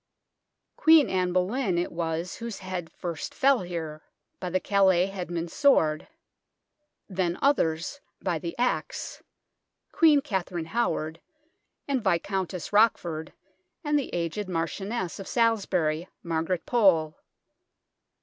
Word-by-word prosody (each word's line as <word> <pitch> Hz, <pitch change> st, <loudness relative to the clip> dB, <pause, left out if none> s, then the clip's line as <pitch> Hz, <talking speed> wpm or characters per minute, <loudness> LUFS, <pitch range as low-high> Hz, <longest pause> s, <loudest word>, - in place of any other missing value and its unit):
Queen 320 Hz, -2 st, +6 dB
Anne 185 Hz, -1 st, +1 dB
Boleyn 185 Hz, +2 st, 0 dB
it 175 Hz, -, -1 dB
was 165 Hz, +1 st, -3 dB
whose 230 Hz, -3 st, -5 dB
head 185 Hz, -3 st, -5 dB
first 170 Hz, -4 st, -5 dB
fell 275 Hz, -1 st, +4 dB
here, 165 Hz, -4 st, -5 dB, 0.4 s
by 180 Hz, -, -3 dB
the 185 Hz, +1 st, +1 dB
Calais 190 Hz, -3 st, +3 dB
headsman's 175 Hz, -3 st, -4 dB
sword; 160 Hz, -, +3 dB, 1.0 s
then 180 Hz, -3 st, -1 dB
others 225 Hz, -, +1 dB, 0.2 s
by 175 Hz, -4 st, -1 dB
the 170 Hz, +1 st, -6 dB
axe 245 Hz, +1 st, -2 dB, 0.7 s
Queen 310 Hz, -3 st, +5 dB
Katharine 190 Hz, -, -3 dB
Howard, 165 Hz, -6 st, -1 dB, 0.7 s
and 270 Hz, -5 st, 0 dB
Viscountess 190 Hz, 0 st, -1 dB
Roch 220 Hz, +2 st, +6 dB
ford, 160 Hz, -2 st, -6 dB, 0.5 s
and 295 Hz, -1 st, +2 dB
the 275 Hz, -, -5 dB
aged 175 Hz, +4 st, -3 dB
Marchioness 185 Hz, +4 st, -3 dB
of 195 Hz, -, -7 dB
Salisbury, 185 Hz, -8 st, +1 dB, 0.2 s
Margaret 165 Hz, +1 st, -1 dB
Pole. 180 Hz, -10 st, +3 dB
185 Hz, 115 wpm, -27 LUFS, 165-225 Hz, 1.0 s, Queen